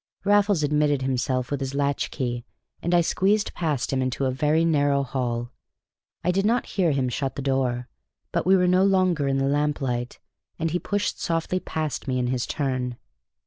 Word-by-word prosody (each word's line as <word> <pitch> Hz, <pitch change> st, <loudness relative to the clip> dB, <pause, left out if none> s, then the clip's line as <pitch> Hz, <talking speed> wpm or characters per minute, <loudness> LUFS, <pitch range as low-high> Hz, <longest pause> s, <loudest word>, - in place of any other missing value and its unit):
Raffles 205 Hz, -4 st, +3 dB
admitted 145 Hz, -2 st, +2 dB
himself 130 Hz, 0 st, -1 dB
with 145 Hz, -, -1 dB
his 135 Hz, 0 st, -4 dB
latch 140 Hz, 0 st, 0 dB
key, 120 Hz, -3 st, -3 dB, 0.4 s
and 170 Hz, -, -1 dB
I 175 Hz, -1 st, +5 dB
squeezed 200 Hz, +5 st, +1 dB
past 150 Hz, -6 st, -1 dB
him 130 Hz, -, +1 dB
into 130 Hz, +1 st, -1 dB
a 130 Hz, -, +1 dB
very 150 Hz, +5 st, +2 dB
narrow 145 Hz, -3 st, +2 dB
hall. 120 Hz, -3 st, -2 dB, 0.7 s
I 180 Hz, -, +2 dB
did 195 Hz, +2 st, +1 dB
not 230 Hz, +4 st, +2 dB
hear 185 Hz, -4 st, +1 dB
him 135 Hz, -2 st, +1 dB
shut 135 Hz, +2 st, -2 dB
the -, -, -4 dB
door, 130 Hz, -3 st, 0 dB, 0.4 s
but -, -, 0 dB
we 190 Hz, -, +6 dB
were 180 Hz, -, +3 dB
no 185 Hz, +1 st, +4 dB
longer 185 Hz, -6 st, +2 dB
in 135 Hz, 0 st, +1 dB
the 135 Hz, -, +1 dB
lamplight, 135 Hz, -4 st, -1 dB, 0.4 s
and 165 Hz, -1 st, -1 dB
he 175 Hz, -, 0 dB
pushed 205 Hz, +2 st, -2 dB
softly 165 Hz, +2 st, 0 dB
past 155 Hz, -5 st, -4 dB
me 130 Hz, -1 st, 0 dB
in 125 Hz, -, 0 dB
his 125 Hz, -1 st, -1 dB
turn. 130 Hz, -4 st, -2 dB
145 Hz, 185 wpm, -25 LUFS, 130-170 Hz, 0.7 s, we